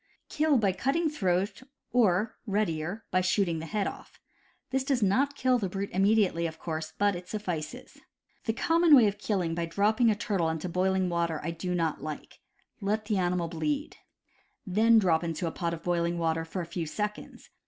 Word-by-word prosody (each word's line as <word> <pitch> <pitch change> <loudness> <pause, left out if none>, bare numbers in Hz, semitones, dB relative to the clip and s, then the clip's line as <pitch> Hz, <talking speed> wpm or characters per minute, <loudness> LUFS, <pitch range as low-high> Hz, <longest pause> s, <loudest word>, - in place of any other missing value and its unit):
Kill 305 -2 +2
by 205 -4 +2
cutting 275 - 0
throat 195 -4 0 0.3
or 215 -3 +2
(readier) 195 0 -1
by 185 - +3
shooting 180 -2 +1
the 160 - -6
head 210 +1 -1
off. - - -8 0.5
This 265 0 +1
does 265 -4 +1
not 270 +9 +2
kill 255 -2 +2
the 195 -4 -2
brute 195 +2 -4
immediately, 195 -3 +3
of 160 -1 -8
course, 160 -1 -5
but 205 -1 +2
it 180 0 -8
suflSces. 180 -7 -5 0.5
The 225 - 0
common 330 +5 +5
way 245 -5 +7
of 205 0 -1
killing 185 -6 -1
by 170 0 -2
dropping 215 +7 +2
a 215 - +3
turtle 195 -6 0
into 160 +2 -3
boil 185 +2 +1
ing 185 -1 +1
water 170 -2 -1
I 165 - -2
do 180 +2 -3
not 165 -3 -1
like. 155 0 -7 0.4
Let 210 +2 -1
the 210 -2 0
animal 175 -1 0
bleed. 285 - -3 0.7
Then 220 +4 +4
drop 175 -6 +3
into 165 0 -3
a 165 - -1
pot 170 0 -2
of 165 0 -6
boiling 170 -1 0
water 165 -1 0
for 180 +3 -4
a - - -6
few 165 -1 -4
seconds. 210 +6 -5
190 Hz, 190 wpm, -29 LUFS, 170-215 Hz, 0.7 s, way